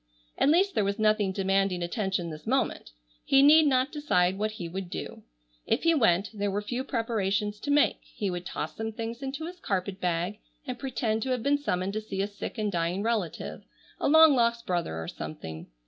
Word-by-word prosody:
At - - +3
least 375 +5 +4
there 210 - +2
was 200 +1 -1
nothing 215 -2 +2
demanding 195 -1 +1
attention 190 -2 -2
this 155 +3 -10
moment. 265 +2 0 0.3
He 275 0 +5
need 305 +2 +7
not 260 +1 +2
decide 190 - +1
what 215 +1 -1
he 180 -5 -6
would 185 +1 -5
do. - - -6 0.5
If - - +1
he 330 0 +5
went 205 - +2
there 205 -1 -1
were 205 +1 -2
few 245 +4 -3
preparations 210 -5 -1
to 285 - -6
make. 290 0 +3
He 200 -3 -4
would 175 0 -4
toss 155 -3 -5
some 220 0 -4
things 230 +2 -5
into 275 +4 -4
his 355 +1 -8
carpet 195 - -2
bag 180 +4 -1 0.3
and 250 -1 -5
pretend 230 -4 -1
to 265 - -2
have 250 -3 -1
been 285 +2 +2
summoned 185 -8 -1
to 215 - -2
see 195 -2 -3
a - - -1
sick 205 +3 -7
and 210 -2 -1
dying 175 +2 -1
relative, 220 -7 -2 0.4
a - - +1
long 315 +1 +8
lost 235 -2 +1
brother 170 - -2
or 80 - -5
something. 80 +1 -7
210 Hz, 205 wpm, -28 LUFS, 185-255 Hz, 0.5 s, long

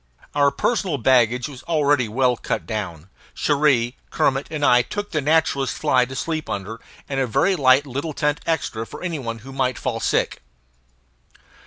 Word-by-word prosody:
Our 145 -1 +4
personal 180 +2 0
baggage 125 0 +3
was 140 -3 -10
already 145 -6 +2
well 125 +2 +2
cut - - -3
down: 95 -5 -5 0.2
Cherrie, 140 -5 +2
Kermit, 135 +1 +1
and 150 -2 -1
I 125 -2 +6
took 205 +11 -5
the 155 - 0
naturalist's 140 -4 +1
fly 130 -5 +3
to 130 +1 -9
sleep 155 +3 -3
under, 105 +3 -5 0.3
and 135 -1 -2
a 130 - +1
very 190 - +2
light 135 -2 +4
little 140 +4 -4
tent 150 +1 0
extra 125 -8 -1
for - - -10
any 170 -4 -2
one 115 -3 -4
who 135 - -9
might 130 -2 0
fall - - -3
sick. - - 0
135 Hz, 170 wpm, -22 LUFS, 125-150 Hz, 0.3 s, I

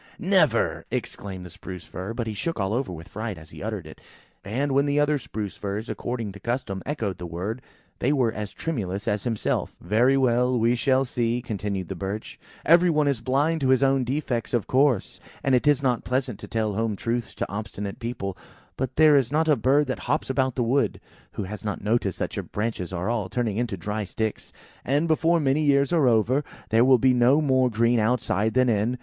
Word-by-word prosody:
"Never!" - - +2
exclaimed 95 -2 -5
the 90 - -10
Spruce 90 +1 -9
fir; 95 +5 -6
but 120 - -2
he 110 - -3
shook 165 +7 -3
all 95 +1 0
over 125 -4 -1
with 85 -1 -8
fright 110 -2 -4
as 80 -1 -13
he - - -10
uttered - - -4
it. - - -12 0.4
And 130 +8 -1
when 140 +2 +3
the 145 +1 +2
other 145 0 +2
Spruce 105 -5 -5
firs, 105 +3 -4
according 120 -4 -4
to 100 - -11
custom, 120 -4 -3
echoed 115 -10 -2
the 90 - -5
word, 95 +9 -4 0.4
they 130 - +2
were 130 -6 +2
as 105 -2 -5
tremulous 100 - -4
as 105 -1 -1
himself. 115 -3 -1
"Very 120 +9 +3
well, 125 -1 +2
we 115 +1 +3
shall 130 +2 +2
see," 120 -1 0
continued 100 -5 -3
the - - -4
Birch. 95 +4 -5 0.3
"Every 175 +3 +6
one 150 -3 +2
is 135 -5 0
blind 145 +5 +1
to 135 - +2
his 130 +1 +4
own 135 -1 +3
defects, 125 -2 -2
of 115 - 0
course; 130 -5 +2 0.2
and 135 - +2
it 125 +3 +3
is 145 -2 +4
not 125 -3 +1
pleasant 125 -4 -1
to - - -9
tell 110 -2 -1
home 110 +1 -1
truths 115 +3 -3
to - - -2
obstinate 100 -1 -5
people. 115 -5 -4 0.4
But 130 -2 -3
there 155 -1 +6
is 135 -3 +3
not 160 +2 +2
a 150 - +5
bird 135 +5 +3
that 130 - -3
hops 145 -1 0
about 130 -1 0
the 125 - +1
wood, 130 +5 +1 0.3
who - - -3
has 100 +2 -7
not 105 -2 -4
noticed 105 -3 0
that - - -3
your - - -2
branches 105 -4 -3
are 90 +1 -3
all 110 -5 -1
turning 115 -1 -1
into 115 -4 -1
dry 105 +4 -3
sticks; 110 +3 -4 0.3
and 145 +5 +1
before 165 +2 +3
many 140 0 +2
years 140 +1 +3
are 155 -6 +4
over, 120 +5 +3 0.3
there 115 +1 +4
will 130 0 +6
be 130 +2 +4
no 125 +4 +4
more 130 -4 +3
green 115 +1 +2
outside 110 -1 +1
than 130 0 +4
in. 115 +2 +1
120 Hz, 215 wpm, -25 LUFS, 105-135 Hz, 0.4 s, Every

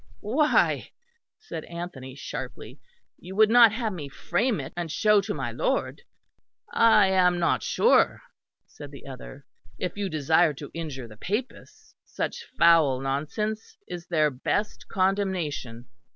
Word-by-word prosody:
"Why," 285 +9 +2 0.5
said 440 0 -7
Anthony 170 -7 -8
sharply, 135 - -7 0.4
"you 190 +1 -9
would 215 +1 +5
not 235 -2 +8
have 220 -1 -2
me 150 -6 -7
frame 205 - -1
it, - - -7
and 170 -2 -4
show 210 +2 +4
to 200 +2 -5
my - - -3
lord." - - -1 0.7
"I 225 -3 +6
am 180 -2 +3
not 170 -1 +1
sure," - - +3 0.4
said 145 - -11
the 140 0 -13
other, 135 +1 -10 0.3
"if 180 +2 -4
you 200 -1 -2
desire 155 +1 +2
to 145 +1 -9
injure 150 -7 -6
the 110 -2 -14
Papists. 215 - -5
Such 470 - -5
foul 160 -6 +5
nonsense 155 - -3
is 175 -1 -7
their 155 -3 +2
best 205 +11 -2
condemnation. 185 - -1
175 Hz, 135 wpm, -26 LUFS, 145-210 Hz, 0.7 s, not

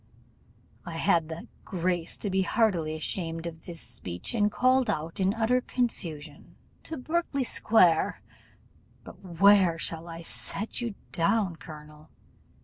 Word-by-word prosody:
I 170 -2 -6
had 165 -3 +2
the 160 +1 -7 0.2
grace 175 -2 -1
to 205 - -3
be 190 +1 +2
heartily 185 -6 +1
ashamed 165 +1 -3
of 165 -1 -7
this 170 -2 -8
speech, 90 - -5
and 210 -2 +2
called 255 +2 +3
out, 160 +4 -2
in 190 0 +3
utter 235 +3 +2
confusion, 165 - -4 0.3
'To 320 - -6
Berkley 300 0 -1
square. 180 -9 +3 0.8
But - - -12
where 185 -1 +5
shall 165 0 -4
I 165 0 -7
set 205 +7 -4
you 230 -4 -3 0.2
down, 190 0 +1
colonel? 150 -1 -12
175 Hz, 135 wpm, -28 LUFS, 165-220 Hz, 0.8 s, where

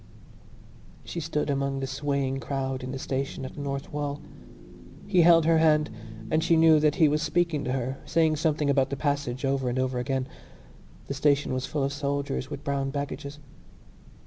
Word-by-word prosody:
She 170 - -5
stood 150 -2 -1
among 140 0 -1
the 135 - -2
swaying 135 0 -1
crowd 135 0 -3
in 130 0 -5
the 135 - -4
station 135 0 -3
at - - -7
the 145 - -7
North 140 0 -4
Wall. 145 -1 -3 0.9
He 180 - +3
held 165 -1 +6
her 165 0 +4
hand 150 -4 +3 0.4
and 160 - +2
she 165 - +4
knew 160 -1 +6
that 150 0 +2
he 160 - +5
was 150 +1 +1
speaking 165 -1 0
to 125 - -1
her, 130 +1 -3
saying 160 -2 +2
something 155 -2 +1
about 135 -1 +2
the 140 - -3
passage 140 -3 -1
over 135 -2 0
and 120 - -2
over 130 -1 0
again. 130 +1 -1 0.8
The - - -4
station 140 0 +2
was 130 0 -2
full 145 -3 -1
of 140 +1 -1
soldiers 140 -2 -2
with 140 - -7
brown 140 -1 -1
baggages. 140 0 -5
140 Hz, 185 wpm, -27 LUFS, 135-150 Hz, 0.9 s, held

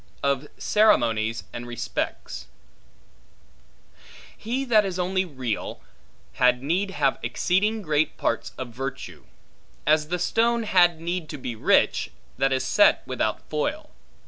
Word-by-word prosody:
Of 140 +1 0
Ceremonies, 115 - +2
And 120 +1 -6
Respects 120 -1 -4 1.9
HE 250 +5 -3
THAT 220 -4 +4
is 190 -2 -3
only 185 +1 0
real, 130 - -4 0.5
had 125 0 +3
need 180 +7 0
have 145 -7 0
exceeding 210 +4 0
great 155 -2 0
parts - - -1
of 130 -2 -5
virtue; 135 +3 -6 0.6
as 155 0 +3
the 180 +3 -1
stone 230 +5 +1
had 175 -5 +4
need 170 -1 -3
to 150 - -6
be 125 -3 -5
rich, 110 - +2 0.3
that 135 0 +2
is 130 0 0
set - - +4
without - - -2
foil. - - -3
155 Hz, 125 wpm, -25 LUFS, 130-190 Hz, 1.9 s, THAT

